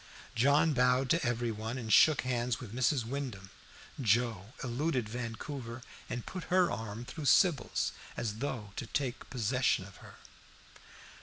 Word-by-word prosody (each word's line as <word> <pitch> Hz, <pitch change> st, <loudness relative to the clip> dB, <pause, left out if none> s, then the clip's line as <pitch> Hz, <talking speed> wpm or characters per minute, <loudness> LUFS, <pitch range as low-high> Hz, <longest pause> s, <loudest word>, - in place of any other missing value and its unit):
John 145 Hz, +6 st, +4 dB
bowed 125 Hz, 0 st, +3 dB
to 170 Hz, 0 st, +3 dB
every 120 Hz, -1 st, 0 dB
one 110 Hz, +3 st, -4 dB
and 110 Hz, -4 st, -1 dB
shook 155 Hz, -3 st, +7 dB
hands 120 Hz, -2 st, -1 dB
with 115 Hz, -4 st, -9 dB
Mrs. 125 Hz, 0 st, +1 dB
Wyndham. 115 Hz, -7 st, -5 dB, 0.5 s
Joe 115 Hz, -4 st, +2 dB, 0.2 s
eluded 130 Hz, -1 st, -1 dB
Vancouver 120 Hz, +2 st, -5 dB, 0.3 s
and 120 Hz, -, -4 dB
put 185 Hz, -3 st, -6 dB
her 180 Hz, -1 st, +3 dB
arm 110 Hz, +1 st, -5 dB
through 150 Hz, +4 st, -7 dB
Sybil's, 150 Hz, -3 st, +3 dB, 0.3 s
as 110 Hz, -2 st, -2 dB
though 115 Hz, -7 st, -4 dB
to 120 Hz, -, -4 dB
take 135 Hz, 0 st, -3 dB
possession 125 Hz, -4 st, +1 dB
of 100 Hz, -, -13 dB
her. -, -, -13 dB
125 Hz, 145 wpm, -32 LUFS, 115-135 Hz, 0.5 s, shook